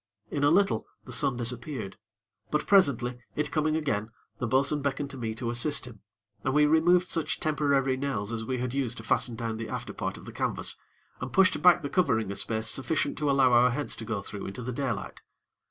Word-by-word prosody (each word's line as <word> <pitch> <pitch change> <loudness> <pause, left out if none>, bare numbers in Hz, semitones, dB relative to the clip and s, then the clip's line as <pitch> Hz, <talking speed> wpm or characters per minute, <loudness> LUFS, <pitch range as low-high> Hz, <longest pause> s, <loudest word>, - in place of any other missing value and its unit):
In 145 - -1
a 145 - +6
little, 195 +5 +2 0.2
the - - -7
sun 140 -5 +1
disappeared; 120 -3 -2 0.5
but, 150 0 0
presently, 125 - +3 0.2
it 150 0 -1
coming 155 0 +1
again, 115 -9 -1 0.3
the 125 - -1
bo'sun 140 +4 +2
beckoned 140 0 -2
to 135 - -8
me 110 -2 -3
to 115 0 -3
assist 125 +5 0
him, 120 -4 -11 0.4
and 130 +1 0
we 150 0 +6
removed 175 +4 +4
such 165 -3 -2
temporary 140 -3 +1
nails 130 -6 -2
as 115 -1 -2
we 130 +3 -2
had 125 0 -3
used 130 -4 -1
to 115 - -8
fasten 115 +1 +1
down 115 -1 -3
the 115 0 -5
after - - -5
part - - -4
of - - -12
the - - -8
canvas, - - -1 0.4
and 125 - -5
pushed 190 -1 +4
back 175 -2 +6
the - - -1
covering 125 - +1
a - - -4
space 110 +1 -1
sufficient 135 +8 0
to 150 -1 +1
allow 135 -2 +4
our 120 +1 +6
heads 140 +4 -2
to - - -6
go 110 -3 -3
through 100 0 -6
into 100 +6 -6
the 125 +2 -4
daylight. 135 -2 -3
130 Hz, 215 wpm, -28 LUFS, 115-150 Hz, 0.5 s, a